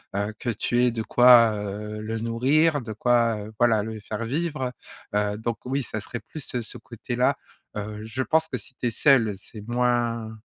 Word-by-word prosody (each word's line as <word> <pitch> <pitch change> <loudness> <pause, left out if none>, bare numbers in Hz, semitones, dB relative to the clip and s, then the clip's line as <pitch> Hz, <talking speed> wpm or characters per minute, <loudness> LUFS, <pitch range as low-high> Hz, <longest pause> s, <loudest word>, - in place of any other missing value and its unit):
heu, 100 +2 -1
que 120 - -3
tu 120 +2 0
aies 125 - +3
de 115 -1 -3
quoi, 120 -1 +7
heu, 105 +1 -5
le 110 +1 -4
nourrir, 135 +8 +2
de 110 -2 -6
quoi, 120 0 +2
heu, 105 +1 -8
voilà, 115 -3 +4
le 110 0 -6
faire 105 +2 -5
vivre, 145 0 -2 0.4
heu, 105 0 0
donc 115 +1 -3
oui, 135 +2 -1
ça 110 -1 -4
serait 115 +2 -6
plus 150 -5 -9
ce 110 - -8
côté-là, - - -1 0.4
heu, 105 0 -5
je 115 +4 -3
pense 160 +3 +2
que 130 - -3
si 125 - -14
tu 125 - -2
es - - 0
seule, 115 -4 +4
c'est 105 +1 -11
moins 120 -2 0
115 Hz, 195 wpm, -25 LUFS, 110-125 Hz, 0.4 s, quoi